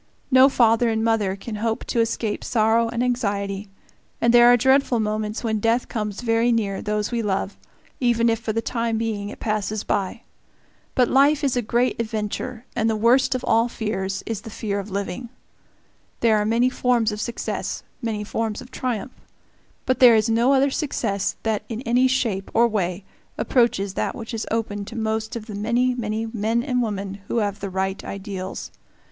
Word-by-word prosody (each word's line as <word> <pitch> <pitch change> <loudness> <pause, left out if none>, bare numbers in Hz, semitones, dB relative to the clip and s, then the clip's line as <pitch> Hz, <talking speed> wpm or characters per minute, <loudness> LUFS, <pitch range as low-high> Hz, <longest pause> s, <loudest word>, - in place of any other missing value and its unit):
No 260 +1 +7
father 235 -2 +3
and 220 0 0
mother 220 -4 +1
can 215 +2 -6
hope 225 +1 -2
to 235 - -1
escape 225 -2 -1
sorrow 225 0 +2
and 235 +1 -1
anxiety, 200 -5 -1 0.5
and 235 0 +3
there 240 0 +8
are 245 - +6
dreadful 265 0 +3
moments 215 +1 -2
when 220 -2 0
death 230 +3 +1
comes 210 -2 -3
very 230 0 +2
near 205 -4 0
those 210 +1 -2
we 235 -1 0
love, 200 -1 -1 0.4
even 235 -2 +2
if 225 -1 +2
for 225 -1 -3
the 225 +1 -2
time 230 -1 -1
being 215 -3 -2
it - - -10
passes 215 -1 -2
by. 200 +4 -2 0.7
But 250 -2 +4
life 280 +4 +4
is 270 -3 +1
a 245 - +1
great 240 +2 0
adventure, 225 +2 -4
and 225 -1 +1
the 220 - +1
worst 245 +5 +3
of 255 - -3
all 230 +1 +3
fears 195 -4 -3
is 225 -3 -3
the 225 - -9
fear 205 -2 -3
of 200 +1 -6
living. 200 +4 -4 0.9
There 225 -2 +4
are 210 - +1
many 235 +4 +2
forms 240 -4 +1
of 210 0 -4
success, 235 +1 -3 0.2
many 220 -3 -2
forms 220 0 -2
of 250 - -11
triumph. 250 -1 -3 0.7
But 255 -1 +1
there 245 -3 +8
is 220 +1 +3
no 235 +4 +3
other 275 +1 +3
success 220 -10 -1
that 220 -2 0
in 225 0 -4
any 245 +2 +3
shape 225 -7 -1
or 235 +1 +5
way 190 -3 -2 0.3
approaches 215 -6 +1
that - - -2
which 225 -1 -7
is 225 - -3
open 215 -2 -2
to 225 - -9
most 220 0 -2
of 225 -2 -5
the 215 - -8
many, 235 +5 +1
many 220 -2 -2
men 225 +1 -1
and 250 -2 0
women 200 -3 -3
who - - -2
have 205 -2 -1
the 200 - -4
right 190 +1 -2
ideals. 190 -1 -6
225 Hz, 190 wpm, -23 LUFS, 210-240 Hz, 0.9 s, there